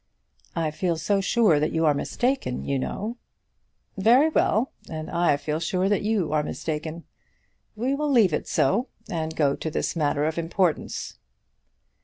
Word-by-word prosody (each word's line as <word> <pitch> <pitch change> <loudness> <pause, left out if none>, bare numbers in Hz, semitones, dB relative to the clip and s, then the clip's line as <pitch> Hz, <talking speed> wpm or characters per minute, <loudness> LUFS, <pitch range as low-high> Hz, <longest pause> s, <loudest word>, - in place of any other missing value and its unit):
"I 165 -2 0
feel 170 +1 -1
so 195 +5 +1
sure 195 -6 +3
that 150 - 0
you 160 0 +1
are 150 - +5
mistaken, 240 - -1
you 140 -1 0
know." 215 - -4 0.8
"Very 240 +10 +5
well; 250 -5 +2 0.2
and 155 -1 -6
I 170 -4 +2
feel 150 +2 -3
sure 185 +3 0
that 205 - +2
you 200 -7 0
are 155 - +3
mistaken. 155 +2 -4 0.7
We 245 +5 0
will 295 +1 -1
leave 225 - +4
it - - -2
so, 235 - +2 0.2
and 160 -2 -3
go 145 -3 +2
to 160 - -4
this 155 - -2
matter 150 -2 +1
of 160 +1 -1
importance." 170 0 -1
165 Hz, 160 wpm, -25 LUFS, 155-215 Hz, 0.8 s, are